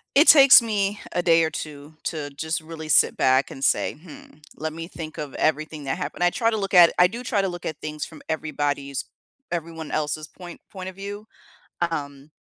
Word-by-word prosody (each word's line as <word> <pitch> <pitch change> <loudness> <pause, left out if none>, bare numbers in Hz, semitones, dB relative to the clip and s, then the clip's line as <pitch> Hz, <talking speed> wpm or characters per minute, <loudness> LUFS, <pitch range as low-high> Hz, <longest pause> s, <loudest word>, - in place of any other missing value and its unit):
It 295 +4 +6
takes 275 -4 +10
me 210 -3 -1
a 175 - 0
day 165 -1 +4
or 160 - +1
2 150 0 -8
to 150 -3 -3
just 160 +3 -3
really 160 0 -9
sit - - +5
back 130 +1 +2
and 135 - -5
say, - - +1
"Hmm, 155 -1 -15 0.2
let 160 0 -4
me 165 0 -6
think 160 -3 -8
of 150 -3 -6
everything 155 -1 -1
that 135 - -2
happened." 180 -1 -5
I 175 - +5
try 230 +2 +1
to 220 - -1
look 195 -1 -3
at 175 -2 +8
I 180 - +7
do 235 +6 -6
try 215 -4 0
to 195 - 0
look 175 -1 -7
at 155 - -4
things 155 -1 -5
from 160 - -12
everybody's 145 -3 -2 0.4
everyone 165 -2 -5
else's 155 0 -2
point 175 -2 -12
point 190 -1 -7
of 185 - -18
view, 205 +2 -7 0.6
um, 145 -1 -6
160 Hz, 205 wpm, -24 LUFS, 150-185 Hz, 0.6 s, takes